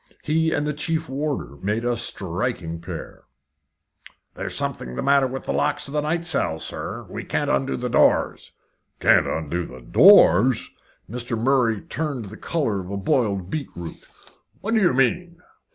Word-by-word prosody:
He 160 +1 +1
and 150 - 0
the 150 - -1
chief 160 +2 -2
warder 140 - -3
made 105 +7 -2
a 120 0 +1
striking 90 -5 -3
pair. 85 -1 -8 1.1
"There's - - -5
something 60 0 -3
the - - -3
matter 140 -1 +4
with 130 +1 -6
the - - -3
locks 150 0 0
of 140 - -9
the 150 - +1
night 165 +3 -1
cells, 140 - 0
sir. - - -4
We - - -6
can't - - -1
undo 65 - 0
the - - -3
doors." - - +2 0.5
"Can't - - +4
undo 80 +2 -2
the 65 - -11
doors!" 125 - +6 0.4
Mr. 120 +1 -3
Murray 115 -3 +2
turned 145 -8 -3
the 110 - -9
colour 140 -12 -1
of 90 -1 -7
a 100 - -3
boiled 100 - 0
beetroot. 85 - -6 0.6
"What 220 +3 -2
do 220 - +3
you 175 -9 +3
mean?" 170 +7 +1
125 Hz, 165 wpm, -23 LUFS, 95-150 Hz, 1.1 s, doors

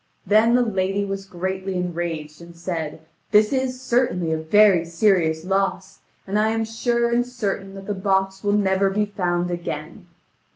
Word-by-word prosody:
Then 215 +4 +4
the 250 - +4
lady 195 -2 -1
was 195 0 -5
greatly 190 +1 -4
enraged, 170 -3 -4
and 170 0 -12
said: 165 -3 -5 0.2
"This 210 +3 +4
is 260 -1 -1
certainly 240 -10 0
a - - 0
very 190 +2 +5
serious 165 -2 +1
loss, 195 0 -1 0.3
and 200 +2 0
I 215 +1 +3
am 225 0 0
sure 235 +1 0
and 240 +1 +3
certain 200 -5 -4
that 195 0 -9
the 205 - -2
box 190 0 0
will 205 0 +1
never 195 -1 +2
be 210 +2 0
found 180 -3 -1
again. 170 +1 -6
195 Hz, 165 wpm, -22 LUFS, 175-210 Hz, 0.3 s, very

